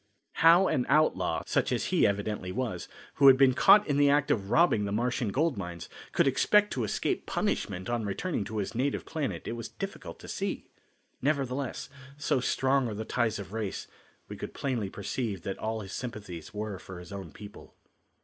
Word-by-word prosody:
How 170 +4 +6
an 125 - 0
outlaw, 95 - +2
such - - 0
as - - 0
he - - +5
evidently 100 -2 -2
was, 110 -5 -3 0.3
who 140 - +6
had 130 -1 +9
been 135 -1 +5
caught 205 +9 +6
in 145 -2 0
the 145 0 +5
act 145 0 +3
of 100 -3 0
robbing 160 -11 +4
the 100 - -3
Martian 120 +2 0
gold 145 +2 0
mines, 85 -3 -6 0.2
could - - +3
expect 210 +10 +3
to 125 - -1
escape 105 - -2
punishment 95 -1 -2
on 120 -1 -1
returning 105 - -2
to 110 - -5
his 100 +1 -2
native 130 +4 -1
planet 155 -4 -4
it - - -2
was 115 -1 -5
difficult - - -7
to - - -10
see. - - -3 0.6
Nevertheless, 135 -2 -1 0.3
so 140 -2 +1
strong 130 +1 +1
are 110 - -4
the 110 +2 -4
ties 115 -2 0
of 100 0 -8
race 110 -3 -3 0.4
we - - -7
could - - -7
plainly 120 -8 -2
perceive 100 -1 -4
that 95 - -4
all 110 0 -2
his 100 -1 -8
sympathies 105 - -6
were 105 -2 -5
for 95 -1 -10
his 90 +1 -11
own 95 -5 -7
people. 105 +4 -12
115 Hz, 190 wpm, -29 LUFS, 100-135 Hz, 0.6 s, had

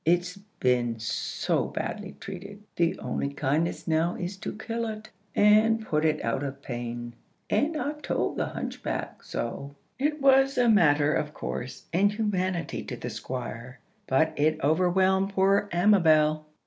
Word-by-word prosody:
It's 175 +2 +1 0.2
been 120 -2 +1
so 115 0 -1
badly 205 -2 -5
treated, 200 +2 -8
the 170 -1 +1
only 140 - -2
kindness 145 +6 -1
now 165 +2 +1
is 180 +2 -4
to - - -5
kill 230 +1 -3
it, 215 0 -6 0.3
and 220 +2 +4
put 155 -5 0
it 155 -1 +1
out 115 +3 0
of 140 0 -5
pain. 120 -1 -5 0.4
And 310 +3 +1
I've 300 0 -3
told - - -1
the - - -1
hunchback - - -5
so." 140 +1 -5 0.2
It 300 +3 0
was 270 0 +4
a 245 -1 +4
matter 150 -7 +4
of 150 0 -2
course 125 +1 -5
and 200 +4 +4
humanity 185 -5 -1
to - - -6
the - - -5
Squire, 125 0 -6 0.3
but 160 +4 +2
it 155 +1 +2
overwhelmed 185 +5 +2
poor 195 +1 +3
Amabel. 160 -5 +4
175 Hz, 150 wpm, -27 LUFS, 145-205 Hz, 0.4 s, and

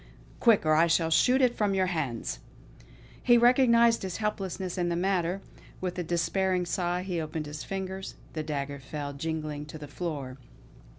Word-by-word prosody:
Quick; 225 -8 +4
or 155 - +4
I 165 +2 +5
shall 165 -1 +2
shoot 255 +11 +4
it 245 -1 +3
from 205 -2 +1
your 190 -1 +2
hands!" 140 - -3 0.8
He 240 -1 +5
recognised 235 -1 +5
his 190 -2 -4
helplessness 195 -4 -3
in 175 -1 0
the 170 - 0
matter. 180 0 0 0.4
With 180 -1 -3
a - - -1
despairing 180 +2 0
sigh 175 0 -1
he 180 -3 -2
opened 155 0 -4
his 150 +1 -6
fingers; 190 0 -5 0.2
the 155 - -2
dagger 140 -2 -4
fell 145 +1 -5
jingling 150 0 -4
to 155 - -8
the 150 -1 -9
floor. 145 -4 -5
175 Hz, 170 wpm, -28 LUFS, 155-195 Hz, 0.8 s, I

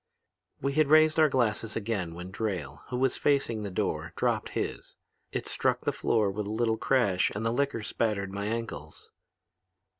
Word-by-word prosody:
"We 140 +1 0
had 155 0 +3
raised 155 +1 +5
our 155 -1 +6
glasses 115 -4 0
again 100 -6 -2
when 90 +2 -7
Drayle, 90 -9 -3
who 125 - -2
was 130 0 +1
facing 135 -6 +1
the 105 - -4
door, 90 - -2
dropped - - 0
his. - - -4 0.4
It - - -3
struck - - 0
the - - 0
floor 105 -3 +1
with 105 +1 -4
a - - -3
little 110 0 +1
crash 110 -10 +2
and 110 +2 -3
the 115 - +2
liquor 135 -3 0
spattered 105 -3 -1
my 100 +1 -3
ankles. 110 -10 -5
110 Hz, 175 wpm, -29 LUFS, 100-130 Hz, 0.4 s, our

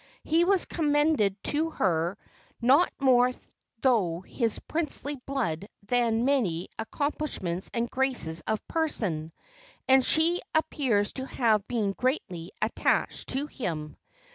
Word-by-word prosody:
He 325 +2 +3
was 385 -1 +3
commended 295 - +2
to 315 +2 0
her 175 - 0 0.4
not 270 +9 +4
more 255 -2 +5 0.5
through 195 -10 +2
his 225 +3 -1
princely 300 -3 -3
blood 215 - -2
than 235 +2 +1
his 230 +2 +1
many 210 -12 +1
accomplishments 220 - -2
and 235 0 -1
graces 245 -12 -1
of 220 -1 -2
person, 195 - -1 0.6
and 265 0 +6
she 330 +6 +3
appears 250 -10 +1
to 265 0 -4
have 215 -6 +1
been 220 -5 0
greatly 190 - -2
attached - - 0
to 275 +2 0
him. 165 - -5
245 Hz, 120 wpm, -28 LUFS, 195-290 Hz, 0.6 s, and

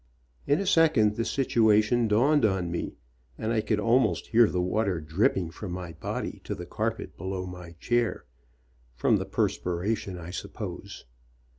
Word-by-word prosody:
In 145 - +3
a 200 - -1
second 150 - +4
the 115 - -1
situation 115 -2 +3
dawned 135 +8 +3
on 95 -5 +1
me, 85 - -4 0.4
and 110 +1 -2
I 110 - +2
could 105 -1 0
al 115 +4 +4
most - - 0
hear 115 -1 +4
the 90 - -1
water 95 0 0
dripping 85 +2 0
from 95 +1 -7
my 90 -2 -6
body 80 - -5
to - - -3
the - - -7
carpet - - -3
below 95 0 -4
my 90 -2 -9
chair, 120 +7 -1 0.7
from - - +3
the - - -3
perspiration, 90 +2 -1
I 85 0 -8
sup 90 - -6
pose. - - -7
105 Hz, 165 wpm, -27 LUFS, 90-115 Hz, 0.7 s, second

